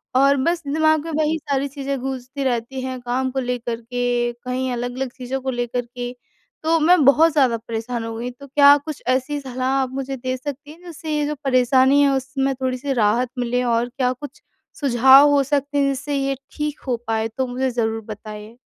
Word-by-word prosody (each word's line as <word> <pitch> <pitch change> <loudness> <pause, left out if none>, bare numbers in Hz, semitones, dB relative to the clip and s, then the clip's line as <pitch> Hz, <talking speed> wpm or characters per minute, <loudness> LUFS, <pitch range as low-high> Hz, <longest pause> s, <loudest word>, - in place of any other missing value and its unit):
और 275 +2 +5
बस 335 +6 0
दिमाग 315 +1 +2
में 330 - -4
वही 315 +1 +1
सारी 275 0 -1
चीज़ें 275 -1 -4
गूँजती 265 +1 -4
रहती 250 +1 -2
हैं, 255 -1 -4
काम 250 +2 -1
को 265 - -2
लेकर 245 -2 -2
के 245 0 -1
कहीं 255 0 -2
अलग-अलग 245 +2 -3
चीज़ों 260 +1 -4
को 265 - -3
लेकर 245 0 -2
के 245 0 -6 0.5
तो 325 +1 +3
मैं 325 0 +5
बहुत 315 +4 +6
ज़्यादा 260 -6 +3
परेशान 230 +1 -4
हो 225 - -5
गई। 240 +2 -4
तो 280 +3 -14
क्या 285 +1 +7
कुछ 310 -3 -6
ऐसी 260 +3 0
सलाह 255 -1 -3
आप 260 -1 -2
मुझे 270 0 -4
दे 255 +1 -3
सकती 285 +2 -7
हैं 330 +3 -15
जिससे 325 -2 -7
ये 295 - 0
जो 300 - -2
परेशानी 260 +2 +4
है 280 - +4
उसमें 270 +1 -1
थोड़ी-सी 260 +1 -2
राहत 235 +1 +2
मिले? 245 +1 0
और 235 0 +1
क्या 250 0 0
कुछ 290 +2 -11 0.4
सुझाव 265 +2 +7
हो 280 -1 +4
सकते 285 +1 -1
हैं 275 - +3
जिससे 275 +2 -3
ये 275 0 0 0.2
ठीक 300 -1 -3
हो 245 - 0
पाएँ? 225 0 0
तो 260 - 0
मुझे 255 +2 -1
ज़रूर 225 -2 -1
बताइए। 215 +1 -9
260 Hz, 200 wpm, -21 LUFS, 245-280 Hz, 0.5 s, क्या